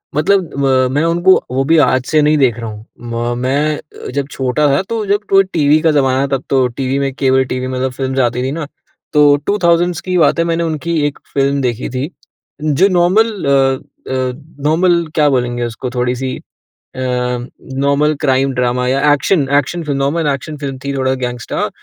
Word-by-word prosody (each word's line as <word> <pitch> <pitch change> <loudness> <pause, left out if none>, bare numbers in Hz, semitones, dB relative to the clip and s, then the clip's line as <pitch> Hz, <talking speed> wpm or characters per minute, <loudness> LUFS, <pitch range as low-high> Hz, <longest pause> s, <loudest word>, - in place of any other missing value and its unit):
मतलब 175 +2 +1
म 130 -1 +3
मैं 145 +3 +1
उनको 175 +3 +4 0.2
वो 130 +1 +1
भी 165 +3 +3
आज 130 -3 +2
से 155 +2 +2
नहीं 150 +1 +3
देख 130 -5 +2
रहा 115 -1 -5
हूँ। 105 +1 -10 0.2
म 120 0 -3
मैं 145 +4 0 0.2
अ, - - -7
जब 140 +1 -2
छोटा 130 +3 0
था - - +2
तो 225 -2 -2
जब 200 +1 +2
टव् 195 0 +6
टीवी 150 -1 +3
का 160 - +3
ज़माना 135 -3 +2
है 140 - 0
तब 135 -1 -1
तो 130 -2 +3
टीवी 130 +2 -2
में 135 -1 -1
केबल 130 -1 +2
टीवी 130 0 -3
मतलब 130 0 -2
फ़िल्म्स 130 +1 -3
आती 120 +1 -3
थी 130 - -2
ना। 155 0 -4 0.5
तो 145 -1 +6
2000's 175 -3 +2
की 185 -1 -1
बात 165 -1 +3
है 165 - +2
मैंने 170 0 0
उनकी 165 +1 -2
एक 145 - -6
फ़िल्म 140 0 +1
देखी 125 -2 -2
थी 130 +4 -3 0.5
जो 155 +5 +3
नॉर्मल 185 +5 +3
अ, 140 - +2 0.6
अ, 130 -1 -1 0.3
नॉर्मल 170 +2 +2
क्या 150 -2 +4
बोलेंगे 120 -2 -1
उसको? 120 +2 -5
थोड़ी-सी 125 +1 -2 0.6
अ, - - -7
नॉर्मल 130 +4 -1
क्राइम 135 -2 +2
ड्रामा 125 0 0
या 140 +3 +3
action 145 +1 +1
action 165 +5 -1
film 145 -3 -2
normal 150 +4 0
action 150 +3 -6
film 140 -2 -5
थी 140 0 -3
थोड़ा 130 0 +1
गैंगस्टर 125 -2 -3
140 Hz, 190 wpm, -16 LUFS, 130-155 Hz, 0.6 s, टव्